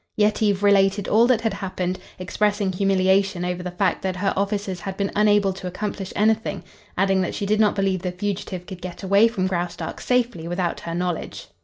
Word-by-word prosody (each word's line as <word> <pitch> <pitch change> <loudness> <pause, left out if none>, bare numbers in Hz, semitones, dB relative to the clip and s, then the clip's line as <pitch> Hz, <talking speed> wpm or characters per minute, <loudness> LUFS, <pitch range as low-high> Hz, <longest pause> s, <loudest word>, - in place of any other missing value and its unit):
Yetive 210 -1 +2
related 195 0 +3
all 230 +3 +4
that 245 -3 +3
had 225 -3 0
happened, 185 -2 -3 0.2
expressing 205 +2 0
humiliation 190 -1 +2
over 180 0 -2
the 180 - -4
fact 180 0 0
that 190 -1 -2
her 195 +2 0
officers 200 -1 -2
had 195 0 -6
been 200 -1 -1
unable 205 -2 +3
to 185 0 -7
accomplish 195 +1 -4
anything, 215 -3 +1 0.3
adding 195 0 +2
that 185 - -2
she 200 - -2
did 210 +2 +1
not 215 -1 +3
believe 195 -2 0
the 180 -1 -2
fugitive 185 -1 -4
could 185 -2 -9
get 180 +2 -7
away 200 +4 +5
from 200 -5 -2
Graustark 175 -1 -3
safely 240 -9 0
without 175 0 -2
her 165 0 -5
knowledge. 175 -1 -3
195 Hz, 190 wpm, -23 LUFS, 185-205 Hz, 0.3 s, away